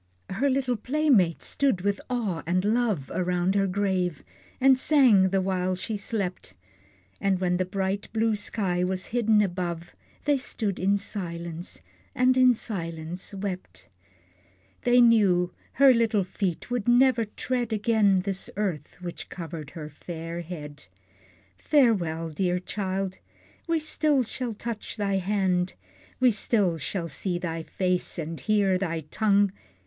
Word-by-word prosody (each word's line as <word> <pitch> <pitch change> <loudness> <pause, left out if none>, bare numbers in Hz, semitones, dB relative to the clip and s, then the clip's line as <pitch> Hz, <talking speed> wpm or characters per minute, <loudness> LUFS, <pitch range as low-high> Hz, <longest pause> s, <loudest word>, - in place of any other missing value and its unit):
Her 265 +9 +1
little 260 -2 0
playmates 250 - +2
stood 270 -10 +1
with 200 +1 0
awe 215 -10 -1
and 185 +2 +1
love 215 - 0
Around 180 0 +1
her 200 -1 +2
grave, 185 -4 -1 0.4
and 265 0 +5
sang 245 -11 +5
the 195 0 +1
while 185 -1 0
she 200 +4 -4
slept; 200 -3 -4 0.7
But 195 -2 +1
when 180 -1 +1
the 185 - 0
bright 195 +1 -2
blue 225 -1 +1
sky 195 -4 -1
was 185 0 -2
hidden 220 -3 +4
above, 175 -3 -4 0.3
They 290 -2 +3
stood 210 -6 -3
in 195 +2 +2
silence, 170 -3 -6 0.3
and 255 0 +4
in 255 -1 +6
silence 170 -3 -5
wept; 180 - -6 1.0
They 245 0 +6
knew 195 -7 +4 0.2
her 275 0 +7
little 225 -4 +2
feet 185 +2 -3
would 245 -3 -1
never 245 -1 +4
tread 240 +2 -3
Again 210 -3 +3
this 195 0 -4
earth, 175 -9 -3
which 175 -1 -7
covered 160 -4 -7
her 155 -2 -5
fair 165 +2 -6
head. 150 -4 -8 0.7
Farewell, 170 - +2
dear 180 +3 0
child! 190 0 -3 0.5
We 335 -1 +2
still 305 -3 +1
shall 240 0 -4
touch 230 +1 -6
thy 200 -2 0
hand, 190 -2 0 0.4
We 255 -1 +5
still 200 -5 +1
shall 170 +3 -3
see 180 +1 -3
thy 165 -2 -3
face, 180 +2 -1
and 165 -1 -4
hear 200 -4 +2
thy 165 -4 -2
tongue. 200 +5 +2
195 Hz, 140 wpm, -26 LUFS, 180-225 Hz, 1.0 s, her